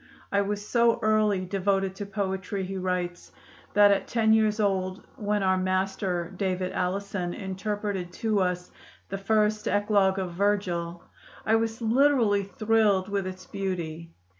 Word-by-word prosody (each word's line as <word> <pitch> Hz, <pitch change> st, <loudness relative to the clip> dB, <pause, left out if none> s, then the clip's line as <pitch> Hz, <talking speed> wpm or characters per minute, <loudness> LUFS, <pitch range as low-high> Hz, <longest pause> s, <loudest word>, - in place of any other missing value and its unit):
"I 200 Hz, -, +3 dB
was 205 Hz, +1 st, -3 dB
so 235 Hz, -1 st, +3 dB
early 215 Hz, -3 st, +2 dB
devoted 195 Hz, 0 st, 0 dB
to 205 Hz, -, -5 dB
poetry," 190 Hz, -1 st, -3 dB
he 195 Hz, +1 st, -5 dB
writes, 180 Hz, -1 st, -3 dB, 0.4 s
"that 205 Hz, 0 st, +7 dB
at 200 Hz, -, +1 dB
ten 220 Hz, -2 st, +3 dB
years 220 Hz, -1 st, +3 dB
old, 190 Hz, -1 st, -1 dB
when 210 Hz, -4 st, -1 dB
our 185 Hz, 0 st, +2 dB
master, 185 Hz, -1 st, -1 dB
David 185 Hz, -1 st, -1 dB
Allison, 185 Hz, -1 st, -2 dB
interpreted 195 Hz, -1 st, -3 dB
to 215 Hz, +1 st, 0 dB
us 180 Hz, -1 st, -1 dB, 0.4 s
the 195 Hz, -, -4 dB
first 210 Hz, +1 st, +1 dB
Eclogue 205 Hz, -2 st, +2 dB
of 185 Hz, -2 st, -2 dB
Virgil, 175 Hz, -3 st, -1 dB, 0.4 s
I 220 Hz, -, +2 dB
was 225 Hz, +1 st, -1 dB
literally 235 Hz, -3 st, +3 dB
thrilled 205 Hz, -1 st, +1 dB
with 200 Hz, -2 st, -1 dB
its 185 Hz, 0 st, -8 dB
beauty. 170 Hz, -4 st, -4 dB
195 Hz, 140 wpm, -27 LUFS, 185-210 Hz, 0.4 s, that